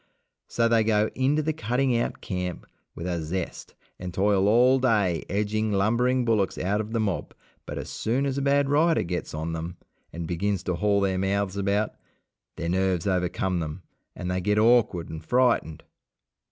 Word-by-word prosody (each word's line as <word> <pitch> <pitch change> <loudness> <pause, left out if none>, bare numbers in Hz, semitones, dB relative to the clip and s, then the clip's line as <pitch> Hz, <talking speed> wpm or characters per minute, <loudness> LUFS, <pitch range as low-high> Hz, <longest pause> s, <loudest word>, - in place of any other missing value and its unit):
So 115 -1 +1
they 115 -1 +3
go 110 -1 +2
into 140 +4 +1
the 155 +1 0
cutting 125 -2 0
out 115 - -2
camp 90 -2 -4 0.3
with 85 - -6
a 85 -2 -2
zest, 85 +3 -5 0.2
and 90 0 -5
toil 100 +1 +2
all 125 +5 +5
day 105 -9 +2
edging 105 +2 0
lumbering 120 +6 +2
bullocks 110 -5 +1
out 100 +4 0
of 110 +1 -7
the 115 - 0
mob, 100 -5 -2 0.3
but - - -5
as - - -5
soon 125 +5 -1
as 135 -1 -1
a 140 - -1
bad 140 0 +2
rider 155 +4 +3
gets 90 -2 -4
on 80 +2 -3
them 85 +2 -5 0.3
and 85 -1 -5
begins 95 +2 -1
to 90 - -1
haul 100 +3 +1
their 95 -1 +1
mouths 100 0 0
about, 100 +2 0 0.6
their 85 -1 -3
nerves 95 -1 +1
overcome 90 -1 0
them, 80 +2 -5 0.3
and 90 0 -4
they 90 0 -1
get 105 +3 +1
awkward 110 -6 +3
and 80 0 -8
frightened. 120 - +1
100 Hz, 180 wpm, -26 LUFS, 90-115 Hz, 0.6 s, all